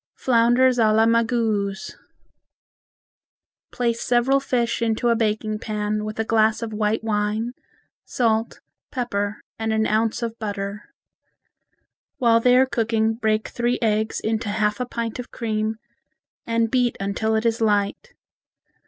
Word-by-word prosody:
Flounders 245 +1 +3
a 220 -2 +4
la 220 +1 +4
Magouze 225 -4 0 1.8
Place 235 -1 -1
several 250 +3 +2
fish 245 -4 -1
into 230 +1 +1
a 235 - +4
baking 215 -1 -1
pan 210 -1 -2
with 215 0 -6
a - - +2
glass 220 0 +2
of 225 -1 -5
white 215 +1 0
wine, 215 +2 -1 0.5
salt, 225 -2 -1 0.3
pepper, 205 -5 -2 0.2
and 220 0 -1
an 220 0 +1
ounce 225 +2 0
of 230 0 -4
butter. 205 -1 -4 1.3
While 230 -2 +4
they 250 +2 +4
are 260 - +5
cooking 225 -3 0
break 220 -1 -1
three 240 +1 0
eggs 220 -1 0
into 220 -1 -2
half 210 +1 0
a 250 - -2
pint 230 -1 -4
of 250 - -6
cream, 220 -1 -2 0.7
and 230 -1 +1
beat 245 -2 +1
until 200 +3 -1
it 220 +1 0
is 230 0 +1
light. 210 - 0
225 Hz, 135 wpm, -23 LUFS, 215-235 Hz, 1.8 s, are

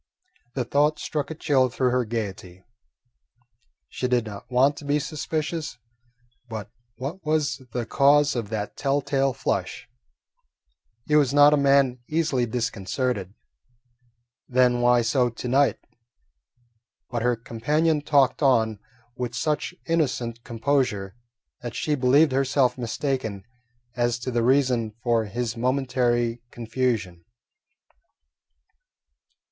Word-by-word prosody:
The 130 -3 -1
thought 145 +4 +2
struck 150 -2 -3
a 160 - -5
chill 135 -4 +2
through 125 +1 0
her 125 -1 +1
gaiety. 95 -5 -5 1.2
She 125 - -3
did 125 -2 +1
not 105 +2 -9
want 130 +3 +3
to 145 - -9
be 145 +1 +2
suspicious, 155 +2 -3 0.7
but 110 -2 -6 0.2
what 145 +9 -6
was 150 -2 0
the 120 0 -3
cause 145 +3 +4
of 115 -4 -3
that 105 -2 -4
tell 140 0 0
tale 135 -1 +1
flush? 120 - -3 1.2
He 150 - +1
was 145 -2 +3
not 145 +1 +7
a - - +6
man 140 -3 +3
easily 150 -6 +1
disconcerted; 110 -2 -2 1.1
then 125 -1 +3
why 120 0 +4
so 125 +1 +2
to 120 +2 -7
night? 135 +3 +3 1.3
But 120 -2 -2
her 120 +1 +2
companion 150 +8 0
talked 145 -2 +2
on 110 -6 +2 0.4
with 125 -1 -4
such 150 +6 -1
innocent 125 -8 -1
composure 115 -5 -1 0.5
that 120 -1 -6
she 150 - -1
believed 140 +3 +4
herself 135 -1 +2
mistaken 120 -4 -3 0.5
as 120 -1 +1
to 130 - -3
the 120 -1 +1
reason 125 -3 +2
for 115 -2 +2
his 115 +2 -3
momentary 120 -2 0
confusion. 115 -7 -2
125 Hz, 120 wpm, -25 LUFS, 115-140 Hz, 1.3 s, not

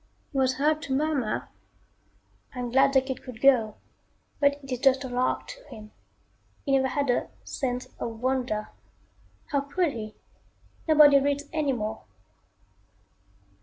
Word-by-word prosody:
He 275 - -5
was 260 0 +2
heard 305 +3 +1
to 275 -4 -2
murmur, 280 -6 -1 1.1
"I - - -5
am 245 -1 -3
glad 270 +2 +5
the 265 -1 +4
kid 265 -1 -5
could 250 -4 -10
go, 235 -6 +4 0.6
but 285 -1 +4
it 270 - -10
is 250 - -2
just 270 0 +3
a - - -4
lark 250 0 -1
to - - -10
him. 215 0 -12 0.7
He 275 - -1
never 265 -1 +3
had 275 0 0
a - - -1
'sense 250 -2 -3
of 225 -1 -5
wonder.' 250 -4 -1 0.8
How 280 -1 +2
could 295 +4 0
he 215 -2 -7 0.7
nobody 295 -3 +7
reads 285 +1 0
anymore." 265 -9 -1
265 Hz, 145 wpm, -27 LUFS, 245-285 Hz, 1.1 s, nobody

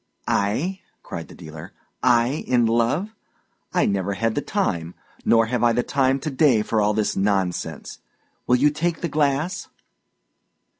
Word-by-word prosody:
"I," 145 - 0 0.2
cried - - -7
the - - -13
dealer. 80 +5 -10 0.3
"I 125 +3 +2
in 120 -2 +3
love! 120 - +1 0.6
I - - +2
never 100 0 0
had 115 +2 0
the 145 - -1
time, 90 - -2 0.3
nor 115 -1 +5
have 120 +1 -1
I 120 -1 +4
the 120 +1 +1
time 135 -1 +1
to 155 - -3
day 130 -6 +3
for 110 0 0
all 105 0 +2
this 110 -1 0
nonsense. 95 -2 -1 0.5
Will 125 - +5
you 145 +4 +4
take 165 +2 -2
the 170 - -1
glass?" 150 +5 0
120 Hz, 155 wpm, -23 LUFS, 105-145 Hz, 0.6 s, nor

